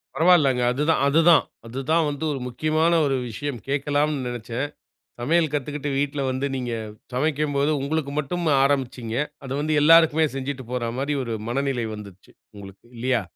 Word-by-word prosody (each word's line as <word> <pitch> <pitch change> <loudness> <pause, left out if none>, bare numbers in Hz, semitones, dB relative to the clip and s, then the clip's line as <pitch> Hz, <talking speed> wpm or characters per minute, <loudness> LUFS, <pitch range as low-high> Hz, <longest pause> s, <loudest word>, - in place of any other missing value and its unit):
பரவால்லங்க 150 -6 +4
அதுதான், 150 +5 +1
அதுதான், 160 +2 +5 0.2
அதுதான் 145 +7 0
வந்து 145 +2 -5
ஒரு 135 - -4
முக்கியமான 155 +6 +1
ஒரு 135 - +1
விஷயம் 135 +3 -5
கேட்கலாம்னு 145 0 0
நெனைச்சேன். 120 +3 -4 0.5
சமையல் 160 +4 +2
கத்துக்கிட்டு 145 0 -3
வீட்ல 140 0 -1
வந்து 130 +2 -2
நீங்க 125 -2 -3 0.4
சமைக்கும்போது 145 +1 0
உங்களுக்கு 140 0 -2
மட்டும் 170 +4 -3 0.2
ஆரம்பிச்சிங்க, 130 -4 -1 0.3
அத 130 - -7
வந்து 155 0 0
எல்லாருக்குமே 160 0 +6
செஞ்சுட்டு 135 -1 -4
போற 120 -2 -2
மாரி 140 +2 -1
ஒரு 115 -2 -3
மனநிலை 135 -2 -1
வந்துச்சு 100 -3 -12 0.2
உங்களுக்கு 100 0 -12
இல்லையா? 125 0 +1
140 Hz, 140 wpm, -24 LUFS, 125-155 Hz, 0.5 s, எல்லாருக்குமே